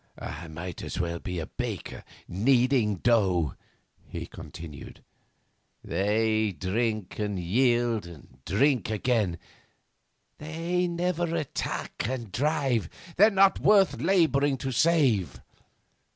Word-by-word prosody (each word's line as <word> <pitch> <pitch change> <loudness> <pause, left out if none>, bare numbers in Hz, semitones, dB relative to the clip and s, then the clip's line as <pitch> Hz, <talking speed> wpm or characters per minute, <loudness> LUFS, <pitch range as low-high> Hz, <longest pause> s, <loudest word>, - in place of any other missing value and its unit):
'I 75 +5 -7
might 85 +2 -7
as - - -5
well 85 -1 -2
be 90 +1 -5
a 80 - -3
baker - - -6 0.2
kneading 120 +2 +2
dough,' 95 - +2 0.5
he - - -6
continued. 75 -4 -10 0.8
'They 110 +1 +1
drink 110 +2 -2
and 105 -2 -2
yield 120 +2 +1
and 70 -6 -14
drink 125 - +2
again; 110 -4 0 1.0
they 165 +4 -1
never 175 -1 -1
attack 145 -7 -3
and 120 -6 -4
drive; 135 - 0 0.3
they're 210 +4 +7
not 195 -2 +4
worth 200 -3 +4
labouring 145 -7 +3
to 130 +1 -4
save. 125 - +2
115 Hz, 110 wpm, -27 LUFS, 95-145 Hz, 1.0 s, they're